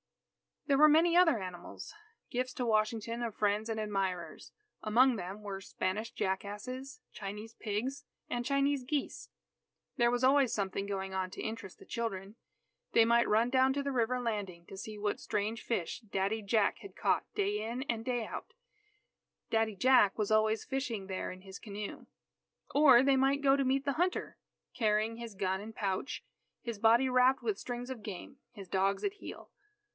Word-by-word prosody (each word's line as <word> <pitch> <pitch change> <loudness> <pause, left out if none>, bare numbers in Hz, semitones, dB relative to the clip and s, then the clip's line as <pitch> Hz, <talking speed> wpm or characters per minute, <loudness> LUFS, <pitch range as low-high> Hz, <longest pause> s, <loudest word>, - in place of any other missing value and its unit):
There 280 -2 +3
were 305 - +9
many 330 +3 +5
other 325 -10 +5
animals 180 -2 -8 0.4
gifts 250 +1 -1
to 250 - -2
Washington 225 +1 0
of 230 -3 -3
friends 210 +2 +1
and 220 -1 -2
admirers. 195 -4 -3 0.3
Among 245 +4 +4
them 195 +1 -6
were 195 -1 -5
Spanish 200 +3 -2
jackasses, 210 +8 -4
Chinese 210 +2 -7
pigs, 235 +6 -3 0.3
and 240 0 -2
Chinese 275 0 +1
geese. 280 +2 -3 0.7
There 235 0 +4
was 245 +1 0
always 265 -2 +4
something 195 -1 -2
going 195 -1 -3
on 190 -1 -1
to - - -7
interest 220 -4 -6
the - - -15
children. 205 -4 -4 0.6
They 230 - +6
might 235 +1 +4
run 225 +3 +3
down 260 0 +4
to 280 +1 -1
the 280 - -1
river 250 0 +1
landing 205 -8 -3
to 195 - -9
see 215 +2 -7
what 205 0 -1
strange 215 +2 -2
fish 185 -8 -2
"Daddy 205 -1 -1
Jack" 210 0 +1
had 395 - -11
caught; - - 0
day 410 0 0
in 240 +4 -3
and 230 -5 -2
day 245 -3 -1
out, - - -7 1.0
"Daddy 225 -1 +1
Jack" 250 -3 +5
was 210 -1 -1
always 215 0 +3
fishing 235 -7 -3
there 190 -1 -3
in 185 0 -10
his 190 0 -10
canoe. 210 -2 -7 0.7
Or 270 -4 +7
they 275 0 +4
might 270 +2 +3
go 275 -1 +5
to 275 -1 +1
meet 265 +1 +1
the 280 - +1
hunter 355 +4 -1 0.4
"carrying 220 0 +1
his 230 -3 -7
gun 190 -1 0
and 220 +1 -9
pouch, 195 +5 -2 0.4
his 235 -4 -5
body 235 +4 +5
wrapped 255 +1 +4
with 425 -3 -1
strings 245 0 -5
of 245 -4 -6
game, 205 +7 -8 0.2
his 200 -4 -10
dogs 195 +1 +1
at 405 0 -1
heel." - - -10
225 Hz, 175 wpm, -32 LUFS, 205-260 Hz, 1.0 s, were